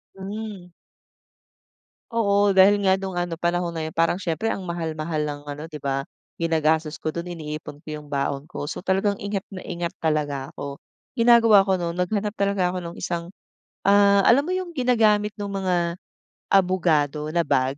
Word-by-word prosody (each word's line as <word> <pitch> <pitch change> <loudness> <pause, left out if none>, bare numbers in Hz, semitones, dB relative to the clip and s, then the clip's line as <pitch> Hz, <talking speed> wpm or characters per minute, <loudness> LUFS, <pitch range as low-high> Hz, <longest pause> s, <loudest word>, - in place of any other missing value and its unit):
Hmm. 200 -1 -7 1.4
Oo, 205 -3 +3
dahil 200 +2 +6
nga 190 - +5
nung 190 -2 -4
ano 175 -1 -2
panahon 175 0 -1
na 160 - -2
yun 160 - -4
parang 165 +2 +2
siyempre 185 +3 -2
ang 195 - -2
mahal-mahal 160 -3 -3
ng 145 -1 -5
ano 145 +1 -7
di 155 - -11
ba? 135 0 -2 0.3
Ginagastos 160 -1 +1
ko 155 - 0
do'n 170 +2 -5
iniipon 150 -1 -7
ko - - -45
yung 150 - -14
baon 140 0 -2
ko. - - -6
So 145 - -4
talagang 195 +2 0
ingat 200 -1 -3
na 190 - -6
ingat 170 -1 -3
talaga 145 -4 -1
ako, 140 0 -6 0.4
ginagawa 230 -4 +6
ko 190 - +3
no'n 170 -1 -3
naghanap 205 +3 0
talaga 200 -3 +1
ako 185 - -4
nung 170 -1 -7
isang, 170 -1 -3 0.6
ah, 200 0 +6
alam 275 +5 +5
mo 360 - -2
yung 370 -1 -2
ginagamit 220 -5 +3
nung 205 - -3 0.2
mga 175 -2 0 0.5
abogado 160 -6 +2
na 170 +1 +1
bag 130 0 +1
175 Hz, 170 wpm, -24 LUFS, 155-200 Hz, 1.4 s, dahil